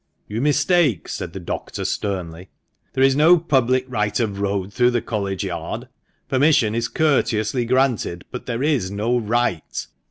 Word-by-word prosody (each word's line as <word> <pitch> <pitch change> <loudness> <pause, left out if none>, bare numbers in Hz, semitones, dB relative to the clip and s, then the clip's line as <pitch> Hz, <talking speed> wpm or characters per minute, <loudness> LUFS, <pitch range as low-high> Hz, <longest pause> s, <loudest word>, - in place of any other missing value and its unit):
"You 110 +3 -3
mistake," 145 - +2
said - - -5
the - - -6
doctor, - - -5
sternly; 90 -3 -3 0.4
"there 130 - +2
is 135 0 +5
no 160 +5 +6
public 130 -5 +1
right 105 -4 -1
of 105 -4 -1
road 100 -1 -2
through 125 0 +4
the 120 -1 +1
College 100 -4 -2
Yard. - - -5 0.4
Permission 130 -5 +3
is 115 0 0
courteously 120 -6 +1
granted, 120 -8 0
but 125 - -7
there 120 +1 -2
is 140 -11 +1
no 105 +5 0
right. 115 -6 -1
120 Hz, 155 wpm, -21 LUFS, 100-135 Hz, 0.4 s, no